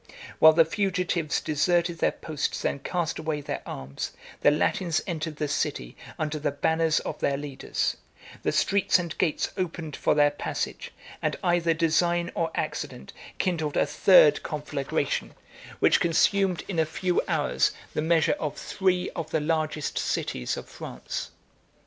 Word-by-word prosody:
82 - - -16 0.2
While 160 0 +9
the 165 0 +5
fugitives 180 -4 0
deserted 170 +3 +1
their - - +3
posts 155 -2 -3
and 140 - -1
cast 175 -3 -2
away 155 -1 -2
their 145 - -4
arms, 65 +1 -5 0.3
the - - +5
Latins 160 +3 +1
entered 160 -3 -3
the 150 0 -2
city 60 - -2 0.2
under 155 0 -2
the 150 - 0
banners 160 +3 +1
of 155 - -5
their 140 - +1
leaders: 140 -2 -2 0.4
the - - 0
streets 200 0 +3
and 170 -2 -4
gates 155 - +1
opened 165 -4 -3
for - - +1
their 145 -1 +5
passage; 145 - -4 0.3
and - - 0
either 170 -2 +2
design 170 +1 +2
or 165 -1 0
accident 65 - -4 0.2
kindled 160 -5 -1
a - - +4
third - - +6
conflagration, - - -2 0.4
which - - +4
consumed 185 +2 +2
in 180 -5 -2
a 160 - +4
few 180 +2 0
hours - - +2 0.2
the - - 0
measure 160 0 +3
of 150 -2 -3
three 185 -2 0
of 165 -3 -5
the 160 - +1
largest 155 -1 -1
cities 60 - -2
of - - -7
France. - - -6
160 Hz, 155 wpm, -26 LUFS, 150-175 Hz, 0.4 s, While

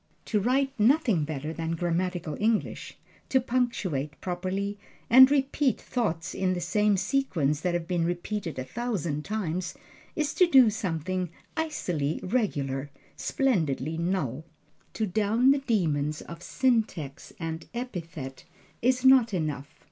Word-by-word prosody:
To 215 - +1
write 265 +6 +2
nothing 225 - +3
better 155 +1 -4
than 165 0 -2
grammatical 175 -1 -1
English, 220 0 -1 0.3
to 265 - +4
punctuate 210 - -1
properly, 190 +3 -3 0.3
and 260 +2 +10
repeat 275 -1 +1
thoughts 190 -10 -2
in 185 -1 0
the - - -2
same 210 +2 +2
sequence 180 - 0
that 175 0 0
have 170 -1 -2
been 175 -2 0
repeated 175 +1 -3
a 130 - -2
thousand 170 - -3
times, 185 -4 -3 0.4
is 305 -3 -1
to 365 - +5
do 260 -9 +7
something 185 -2 -2 0.3
icily 180 - -1
regular, 145 - -1 0.3
splendidly 160 - 0
null. 160 -6 -1 0.5
To 220 - -1
down 215 +6 +3
the 280 - +3
demons 155 - 0
of 170 0 -10
syntax 215 - -1
and 165 -1 -5
epithet 165 - -6 0.4
is 255 +2 +2
not 255 -5 +6
enough. 150 -4 -3
185 Hz, 130 wpm, -27 LUFS, 160-240 Hz, 0.5 s, and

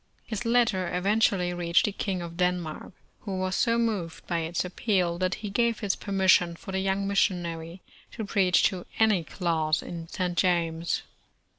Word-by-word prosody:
Plis 220 0 -3
letter 230 -6 +2
eventually 190 -1 +2
reached 170 -1 +2
the 210 - 0
King 190 -2 -3
of 170 0 -8
Denmark, 180 -2 -2 0.3
who 195 -3 -5
was 185 0 -1
so 230 +3 +2
moved 205 -8 -2
by 170 -2 -1
its 165 +2 -2
appeal, 180 -2 0
that 185 0 0
he 205 - -4
gave 235 +2 +1
his 205 -3 0
per 200 - -8
mission 185 -3 +4
for 190 - -9
the 190 - -1
young 195 +1 0
missionary 175 -3 -1 0.3
to 220 - -4
preach 195 -3 +3
to 185 -4 0
any 215 -6 +3
class 160 -3 0
in 165 -1 -7
St. 180 0 -2
Thomas. 170 -2 +1
185 Hz, 170 wpm, -27 LUFS, 170-200 Hz, 0.3 s, mission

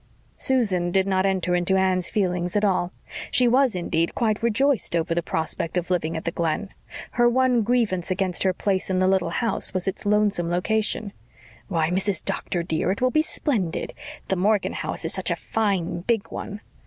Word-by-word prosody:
Susan 200 -10 +2
did 190 +1 +2
not 190 0 +1
enter 185 -2 0
into 175 +2 +1
Anne's 185 -2 +2
feelings 180 -3 -1
at 210 0 +3
all. 185 -2 +1 0.4
She 250 - +4
was, 255 -2 +3
indeed, 170 -1 -1
quite 220 -3 0
rejoiced 235 -2 +1
over 165 +1 0
the 170 - 0
prospect 160 +1 -2
of 180 +1 -2
living 165 -2 0
at 160 - -6
the 170 - 0
Glen. 170 +4 -1 0.4
Her 240 0 +4
one 250 -1 +3
grievance 215 -6 0
against 185 -1 0
her 190 - +3
place 190 +1 -1
in 185 - +1
the 185 0 +3
little 190 -3 +2
house 225 +2 -1
was 185 0 0
its 195 - -3
lonesome 205 -4 +2
location. 210 +3 -1 0.5
"Why, 165 -3 0
Mrs. 190 -1 -1
Doctor, 175 -2 -2
dear, 165 0 -1
it 195 - -2
will 255 0 +2
be 310 - +3
splendid. 225 - -2 0.3
The 190 - 0
Morgan 205 +2 +1
house - - -3
is - - 0
such - - -2
a - - +1
fine, 195 -6 -1
big 225 +2 -1
one." 205 0 -6
190 Hz, 190 wpm, -24 LUFS, 175-215 Hz, 0.5 s, She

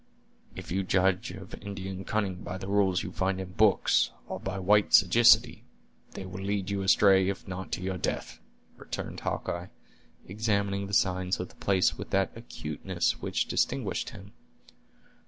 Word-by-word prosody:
"If - - -8
you 95 +2 +1
judge 95 +3 +1
of 95 0 -10
Indian 95 -1 -6
cunning 95 -4 -2
by 90 - -5
the 95 - -7
rules 100 -2 +2
you 95 - -6
find 95 +1 -1
in 95 -1 -6
books, 105 +1 +3 0.2
or - - -5
by 95 +1 -4
white 105 +2 +4
sagacity, 115 +4 +5 0.5
they 95 - -7
will 95 +1 -7
lead 100 0 -2
you 100 -1 -1
astray, 95 -1 +5
if 100 - -5
not 95 0 -6
to 90 - -2
your 95 -1 -3
death," - - -3 0.4
returned - - -6
Hawkeye, 85 +1 -3 0.6
examining 100 -1 -1
the 100 - -1
signs 95 -3 +1
of 90 - -4
the - - -19
place 95 -2 +1
with - - -6
that 95 0 +1
acuteness 90 -5 -3
which - - -1
distinguished - - -1
him. - - -12
95 Hz, 160 wpm, -28 LUFS, 95-100 Hz, 0.6 s, sagacity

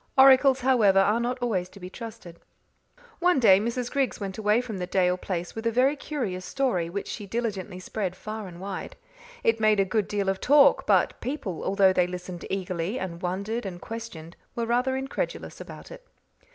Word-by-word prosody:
Oracles, 265 0 +7
however, 235 -7 +4
are 205 +4 +4
not 245 +1 -1
always 185 -7 -1
to 200 - -14
be 180 - -7
trusted. 210 -4 -10 0.8
One 355 -4 +3
day 195 -6 +6
Mrs. 235 +3 -2
Griggs 275 -3 0
went 195 0 -5
away 210 +1 +3
from 225 -6 -5
the 180 - -3
Dale 180 -1 +2
place 180 -1 -4
with 225 +1 -3
a - - +2
very 260 +5 +3
curious 240 -12 -4
story, 180 -5 -1
which 200 +3 -4
she 205 -3 -6
diligently 200 -4 -3
spread 185 -1 -4
far 215 +1 -6
and 175 -1 -11
wide. 195 0 -6 0.5
It 225 0 +2
made 215 -1 +3
a 195 - +4
good 200 +1 0
deal 200 -2 -1
of 195 0 -1
talk, 285 +1 +5
but - - +2
people, 250 - -4
although 195 -1 +4
they 180 -1 +2
listened 180 -1 -7
eagerly, 185 +2 -2
and 175 -4 -5
wondered 200 +6 -2
and 185 -3 -6
questioned, 190 -7 -8 0.2
were 235 - -1
rather 250 +3 +1
incredulous 270 - -4
about - - -10
it. - - -11
210 Hz, 190 wpm, -26 LUFS, 185-245 Hz, 0.8 s, Oracles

